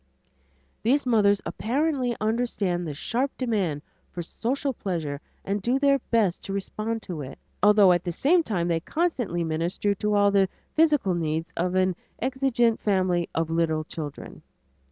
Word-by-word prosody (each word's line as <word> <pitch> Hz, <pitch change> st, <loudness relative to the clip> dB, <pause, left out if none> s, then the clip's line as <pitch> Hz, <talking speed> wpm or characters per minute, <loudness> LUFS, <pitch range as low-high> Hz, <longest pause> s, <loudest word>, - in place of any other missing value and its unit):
These 270 Hz, +5 st, +2 dB
mothers 205 Hz, -4 st, +3 dB
apparently 260 Hz, 0 st, 0 dB
understand 215 Hz, -6 st, -1 dB
the 150 Hz, -, -5 dB
sharp 245 Hz, -, -1 dB
demand 195 Hz, -, -1 dB, 0.3 s
for 175 Hz, -, -5 dB
social 265 Hz, -, -2 dB
pleasure 160 Hz, -, -3 dB, 0.2 s
and 200 Hz, +1 st, -1 dB
do 245 Hz, +6 st, +1 dB
their 275 Hz, 0 st, +3 dB
best 210 Hz, -7 st, +1 dB
to 195 Hz, -, -4 dB
respond 215 Hz, +3 st, -3 dB
to 170 Hz, -5 st, -5 dB
it, 135 Hz, -1 st, -8 dB, 0.2 s
although 205 Hz, -2 st, +6 dB
at 175 Hz, 0 st, +2 dB
the 175 Hz, -, -2 dB
same 325 Hz, -, +3 dB
time 185 Hz, -, -1 dB
they 165 Hz, -1 st, +1 dB
constantly 245 Hz, -, -1 dB
minister 165 Hz, +5 st, 0 dB
to 210 Hz, +2 st, -1 dB
all 205 Hz, 0 st, +4 dB
the 195 Hz, -1 st, +3 dB, 0.2 s
physical 295 Hz, -, +3 dB
needs 160 Hz, -1 st, -2 dB
of 180 Hz, +2 st, -1 dB
an 185 Hz, -1 st, +2 dB, 0.2 s
exigent 255 Hz, -3 st, +1 dB
family 185 Hz, -4 st, +1 dB
of 165 Hz, 0 st, 0 dB
little 160 Hz, -1 st, +1 dB
children. 150 Hz, -2 st, -8 dB
200 Hz, 155 wpm, -26 LUFS, 170-240 Hz, 0.3 s, although